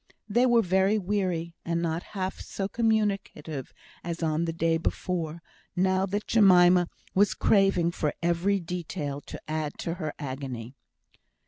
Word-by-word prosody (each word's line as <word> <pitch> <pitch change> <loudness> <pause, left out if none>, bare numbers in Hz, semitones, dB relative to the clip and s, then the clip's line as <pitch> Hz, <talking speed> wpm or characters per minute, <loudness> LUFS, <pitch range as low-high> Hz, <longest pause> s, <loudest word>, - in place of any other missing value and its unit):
They 240 +4 +3
were 235 -2 +4
very 190 +3 +3
weary; 180 -4 -1
and 170 0 -1
not 165 0 -1 0.2
half 185 0 -2
so 195 - -4
communicative 200 - -1 0.3
as 170 0 -4
on 160 +1 +1
the 165 - -1
day 165 0 +1
before, 165 -1 -3 0.3
now 190 +1 +2
that 205 +2 -2
Jemima 180 -4 +6 0.2
was 200 +1 +3
craving 195 -4 +3
for 150 -3 -1
every 175 +4 +1
detail 165 -4 -4
to - - -9
add 155 -1 -3
to 165 - -3
her 155 -1 -3
agony. 130 -4 -5
175 Hz, 140 wpm, -27 LUFS, 160-195 Hz, 0.3 s, Jemima